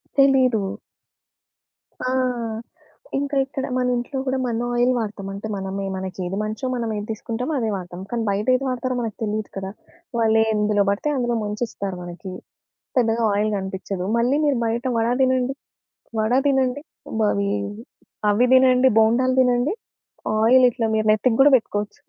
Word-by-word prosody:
తెలీదు. 260 -6 +4 1.4
ఆ! - - 0 1.1
ఇంకా 285 0 -2
ఇక్కడ 270 0 -4
మన 250 0 +1
ఇంట్లో 245 +3 -4
కూడా 265 0 0
మన 235 0 -1
ఆయిల్ 245 +1 +3
వాడతాం. 210 -3 -4
అంటే 200 +2 -6
మనమే 195 0 -4
మనకేది 190 0 -4
మంచో 215 +4 -4
మనమేది 220 -4 -3
తీసుకుంటామో 235 +6 -4
అదే 225 -2 -1
వాడతాం. 175 -1 -7
కానీ 235 -1 -2
బయటేది 250 +7 +1
వాడతారో 255 0 -2
మనకు 225 -3 -4
తెలియదు 215 0 -2
కదా! 190 0 -4 0.5
వాళ్ళెందులో 220 -2 +2
పడితే 200 +9 0
అందులో 240 -1 0
ముంచిస్తారు 205 -3 -4
మనకి. 175 +2 -8 0.7
పెద్దగా 230 -1 +2
ఆయిల్ 210 +1 +1
కనిపిచ్చదు. 190 -1 -4
మళ్ళీ 250 +5 +2
మీరు 285 -4 +2
బయట 235 +3 -1
వడ 225 0 +1
తినండి, 260 0 +2 0.7
వడ 220 +2 +1 0.2
తినండి, 265 0 +1 0.4
బవీ 200 -1 +1 0.8
అవి 245 +5 +3
తినండి, 260 0 +5
బోండాలు 255 +4 +3
తినండి 250 +6 +2 0.7
ఆయిల్ 250 +4 +6
ఇట్లా 230 -1 -2
మీరు 215 0 +1
నెత్తికి 225 +2 +2
కూడా 290 - +7
పెట్టుకోవచ్చు. 210 -3 -2
225 Hz, 135 wpm, -22 LUFS, 205-255 Hz, 1.4 s, కూడా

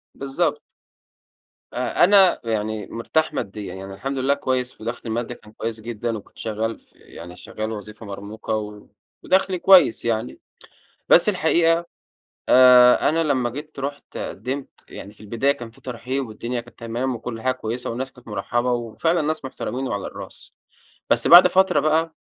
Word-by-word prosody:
بالضبط. 150 +2 -1 1.1
أ 125 +6 0
أنا 195 -1 +5
يعني 110 -2 -3
مرتاح 155 +7 -1
ماديًا، 100 -4 -5
يعني 95 +1 -8
الحمد 135 +7 -4
لله 135 +2 +2
كويّس 130 -3 -3
ودخلي 115 +3 -5
المادي 120 +2 -3
كان 105 - -18
كويّس 110 0 -5
جدًا، 115 0 -4
وكنت 100 - -15
شغّال 110 +1 -3 0.2
يعني 85 +1 -12
شغّال 110 +3 -6
وظيفة 110 +1 -8
مرموقة، 105 +1 -6 0.4
ودخلي 190 -1 +1
كويّس 180 -12 +5
يعني، 115 +1 -2 0.7
بس 175 - +6
الحقيقة 170 -2 +2 0.6
آآ، 125 0 +7
أنا 165 +2 +1
لمّا 130 -6 0
جيت 150 +3 -9
رحت 140 +1 -6
قدمت 130 +7 -5 0.2
يعني 100 - -10
في 105 - -22
البداية 115 +6 0
كان 120 -4 -9
في 115 - -20
ترحيب 130 +2 -4
والدنيا 120 +3 -4
كانت 120 +1 -18
تمام 120 +2 -3
وكل 115 0 -7
حاجة 130 0 +1
كويّسة 120 0 -5
والناس 130 +3 -4
كانت 125 -2 -18
مرحبة، 120 +3 -1
وفعلًا 120 +8 0
ناس 155 0 -2
محترمين 130 0 -4
وعلى 100 -2 -3
الراس، - - -11 0.6
بس - - +2
بعد 175 +1 +10
فترة 190 +1 +3
بقى 160 +1 +1
125 Hz, 150 wpm, -22 LUFS, 110-140 Hz, 1.1 s, بعد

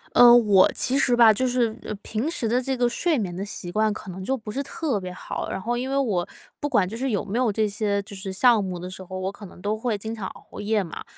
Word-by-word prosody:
呃， 240 -1 +9
我 205 -5 +5
其 260 - 0
实 250 -3 +3
吧， 230 -2 +7
就 255 +5 0
是， 240 -3 +1
呃 - - -5
平 225 +8 -2
时 290 -9 -2
的 245 +3 +2
这 265 +1 -1
个 245 0 +3
睡 320 +6 +1
眠 185 -7 -3
的 190 - -4
习 200 -3 -6
惯 215 +3 +2
可 205 -2 -7
能 185 +1 -7
就 265 +7 -1
不 215 -3 -8
是 270 - -2
特 280 -4 -2
别 185 -1 -6
好， 180 - -5
然 - - -3
后 235 +5 -2
因 255 +2 -3
为 275 - 0
我 205 -10 0 0.3
不 290 - -2
管 190 -9 +3
就 215 - -6
是 265 +3 -1
有 205 -4 -1
没 210 +5 -2
有 250 -4 +2
这 215 +1 +1
些， 205 0 -1
就 200 - -10
是 190 0 -5
项 225 +2 +4
目 185 -2 -4
的 180 - -6
时 185 - -8
候， 185 +1 -7
我 190 +1 -2
可 200 0 -11
能 180 - -15
都 205 +3 -1
会 220 -1 -2
经 220 +3 -5
常 210 -4 -5
熬 - - -12
夜 210 0 +1
嘛。 165 - -8
215 Hz, 305 characters per minute, -24 LUFS, 195-245 Hz, 0.3 s, 呃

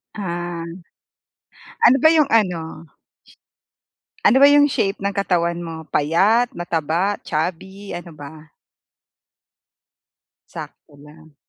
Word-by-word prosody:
Ah. 175 -3 -5 1.2
Ano 250 - +7
ba 315 - +5
yung 305 -3 +3
ano? 165 -7 -1 1.4
Ano 265 +2 +5
ba 285 - +8
yung 290 0 +6
shape 200 -8 -1
ng 200 0 -3
katawan 175 -4 -1
mo? 160 -1 -8
Payat, 200 +11 +2
mataba, 175 +3 -2
chubby, 190 +5 -5
ano 175 0 -7
ba? 150 +1 -12 2.0
Sakto 145 - -11
lang. 150 +1 -17
175 Hz, 100 wpm, -20 LUFS, 160-205 Hz, 2.0 s, ba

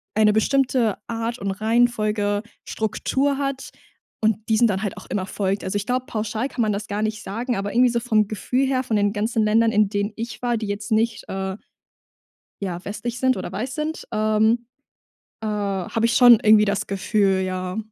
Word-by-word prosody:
eine 215 0 +4
bestimmte 245 -1 +2
Art 230 +1 -3
und 195 0 -2
Reihenfolge 215 -1 +1 0.2
Struktur 270 +6 -1
hat 275 -1 -3 0.5
und 220 0 0
diesen 220 +2 +4
dann 195 -1 -1
halt 205 - -3
auch - - -11
immer 185 0 -2
folgt. 195 0 -2
Also 190 - -3
ich 205 - -3
glaube, 250 +1 0
pauschal 225 +3 -3
kann 245 - -3
man 215 -2 +2
das 205 +1 -4
gar 205 +1 -3
nicht 215 0 -2
sagen, 235 +5 -3
aber 200 0 -3
irgendwie 250 +2 +5
so 235 0 0
vom 215 -3 +2
Gefühl 250 +6 -1
her, 260 -1 0
von 235 -3 -1
den 205 0 +2
ganzen 220 +1 0
Ländern, 225 +2 +3
in 210 -2 +3
denen 205 0 -1
ich 230 -1 -6
war, 240 -1 0
die 215 -1 -4
jetzt 205 +1 -5
nicht, 220 0 +1
äh, 190 0 -3 1.0
ja, 180 -3 -4
westlich 235 +4 -5
sind 260 0 +2
oder - - -5
weiß 230 +7 -4
sind, 310 +1 -4
ähm, 215 +2 +2 0.8
äh, 220 - -3
habe 205 +1 -1
ich 235 - +2
schon 245 -3 +8
irgendwie 215 0 +6
das 200 -1 -1
Gefühl, 195 -1 +1
ja. 185 0 -3
215 Hz, 190 wpm, -23 LUFS, 205-235 Hz, 1.0 s, schon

